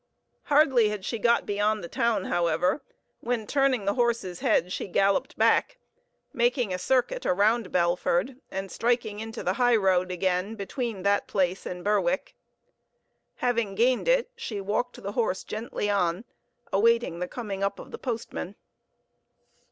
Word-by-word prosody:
Hardly 275 -8 +4
had 210 -2 -5
she 230 - -3
got 235 +2 +3
beyond 210 0 0
the - - -5
town, 225 0 0
however, 175 - +1 0.4
when 235 -2 -2
turning 270 -4 +1
the 200 - +2
horse's 235 -8 0
head 180 +2 +1
she - - -4
galloped 195 +1 +1
back, - - +3 0.6
making 240 -4 +1
a 180 - -2
circuit 265 - +1
around 210 +2 +2
Belford 180 +7 +1
and 195 0 -5
striking 230 -3 0
into 225 +1 -6
the 185 - +1
high 245 -1 +5
road 185 -3 +2
again 185 +3 -1
between 220 -1 -4
that 200 0 +2
place 185 -1 0
and 180 0 -6
Berwick. 210 +7 0 1.1
Having 235 -5 0
gained 245 - +2
it, - - +2
she 240 - -5
walked 215 +5 -2
the 200 - -3
horse 210 -4 -1
gently 215 -1 -4
on, 195 0 0 0.5
awaiting 230 -3 +2
the 180 - -2
coming 200 -3 -5
up 200 0 -1
of - - -11
the - - -7
postman. 225 -5 -4
210 Hz, 150 wpm, -27 LUFS, 190-240 Hz, 1.1 s, high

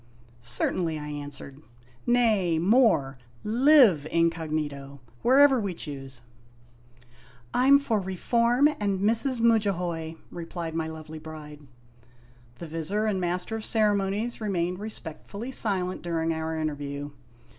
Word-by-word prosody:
"Certainly," 155 +7 0
I 150 0 -6
answered; 145 -1 -8 0.5
"nay, 220 -9 +3
more: 175 - +3 0.2
live 230 - +5
incog, 165 -1 +1 0.7
wherever 270 +1 +5
we 200 -5 -3
choose! 135 -5 -7 0.3
" 120 0 -29
" - - -26 0.3
I 250 +1 +2
'm 280 +1 +8
for 235 -6 0
Reform 235 +8 +2
and 200 -2 0
Mrs. 230 +5 +1
Mudjahoy," 180 -8 +1 0.2
replied 170 -1 -6
my 160 -1 -2
lovely 160 0 -8
bride. 155 -1 -10 1.0
The 170 - -8
Vizir 165 +7 -2
and 200 -4 0
Master 180 +5 -2
of 220 - -5
Ceremonies 210 +1 0
remained 180 -3 -1
respectfully 210 +3 -7
silent 190 -7 -1
during 165 -1 -1
our 160 0 -3
interview. 145 -2 -4
175 Hz, 120 wpm, -26 LUFS, 155-220 Hz, 1.0 s, m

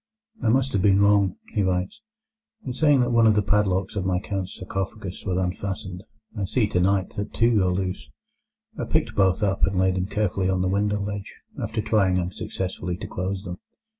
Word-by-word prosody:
"I 115 - +2
must 130 +3 +2
have 100 - +2
been 100 0 +4
wrong," 100 -2 +4 0.2
he 105 - +1
writes, 95 - -1 0.6
"in 130 - -3
saying 145 -1 +4
that 120 0 +1
one 115 -1 +5
of 110 - +5
the 105 - +2
padlocks 95 -1 +1
of 100 - -1
my 90 -1 +1
Count's 95 -1 -4
sarcophagus 95 0 -5
was 90 -1 0
unfastened; 95 0 -3 0.3
I 100 -3 -2
see 110 +4 +1
tonight 95 -1 +1
that 100 - -4
two 115 -2 +3
are 90 - +2
loose. 90 -6 -3 0.7
I - - -1
picked - - 0
both 95 +1 +2
up, 95 -1 0
and 95 -1 +2
laid 95 0 +3
them 90 +1 -1
carefully 100 -3 0
on 95 -1 +1
the 95 - +1
window 105 +1 +1
ledge, 100 -1 -5 0.3
after 110 -1 -2
trying 95 -5 +2
unsuccessfully 90 0 -4
to - - -7
close 95 +2 -3
them. 90 -2 -6
95 Hz, 195 wpm, -24 LUFS, 95-105 Hz, 0.7 s, one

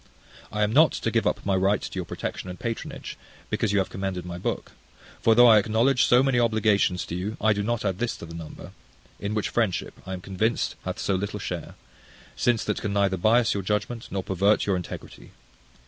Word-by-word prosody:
I 105 0 0
am 105 +1 0
not 155 +4 +6
to - - -2
give - - +1
up - - -1
my 100 -1 +2
right 95 +2 +2
to - - -7
your 95 -2 -3
protection 90 - -5
and 90 - -8
patronage, 115 -1 -5 0.3
because - - 0
you 100 - +2
have 95 - 0
commended 95 -2 -4
my 90 0 -6
book: - - -3 0.5
for 115 - +4
though 120 +1 +8
I 110 -3 +8
acknowledge 115 +5 +3
so 125 +2 +5
many 135 -3 +2
obligations 110 -5 +2
to 85 - -5
you, 100 +5 -4
I 110 0 +3
do 105 - -2
not 115 +1 -1
add 95 -1 -1
this 120 -1 -1
to - - -8
the 85 - -10
number; 85 -2 -9 0.5
in 105 +1 -3
which 105 - -1
friendship, 110 -6 -1
I 95 - -4
am 90 - -5
convinced, 100 +5 -1
hath - - -3
so 100 - -1
little 95 +2 -2
share: - - -5 0.6
since 120 -2 +1
that 105 - -2
can 105 - -2
neither 100 -1 +2
biass 110 +5 +3
your 100 - -2
judgment, 105 +4 -2
nor 95 -1 -3
pervert 100 +3 +2
your 100 - +1
integrity. 90 - -8
105 Hz, 215 wpm, -26 LUFS, 95-115 Hz, 0.6 s, though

